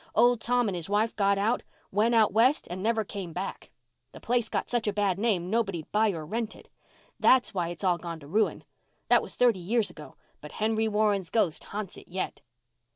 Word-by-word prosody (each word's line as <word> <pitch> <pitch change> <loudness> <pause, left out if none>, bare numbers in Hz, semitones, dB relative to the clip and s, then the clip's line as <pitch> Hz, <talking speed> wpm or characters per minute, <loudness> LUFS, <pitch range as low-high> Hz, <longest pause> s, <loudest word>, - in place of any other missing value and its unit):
Old 240 +1 +4
Tom 245 -1 +2
and 200 - -1
his 170 +1 -5
wife 215 +2 +1
got 200 -1 +2
out—went 220 +1 0
out 220 -4 +4
West 245 +7 +3
and 185 +1 -4
never 225 +1 +1
came 190 -4 -7
back. 185 +3 -5 0.4
The - - -10
place 240 -2 0
got - - -2
such 240 -3 -1
a 210 - +1
bad 200 -2 0
name 195 -5 0
nobody'd 195 -8 -1
buy 215 +1 +3
or 165 -5 -4
rent 225 +6 -3
it. - - -17 0.5
That's 255 -3 +4
why 175 -3 -1
it's 175 +3 -7
all 180 -2 +2
gone 170 -2 -6
to 140 - -12
ruin. 215 +8 0 0.5
That - - +6
was - - -9
thirty 240 -6 +3
years 215 +4 0
ago, 150 - -12 0.3
but 150 - -10
Henry 220 +1 0
Warren's 210 -4 +1
ghost 185 -8 0
ha'nts 205 -2 -6
it - - -17
yet." 185 +1 -4
210 Hz, 205 wpm, -28 LUFS, 185-225 Hz, 0.5 s, That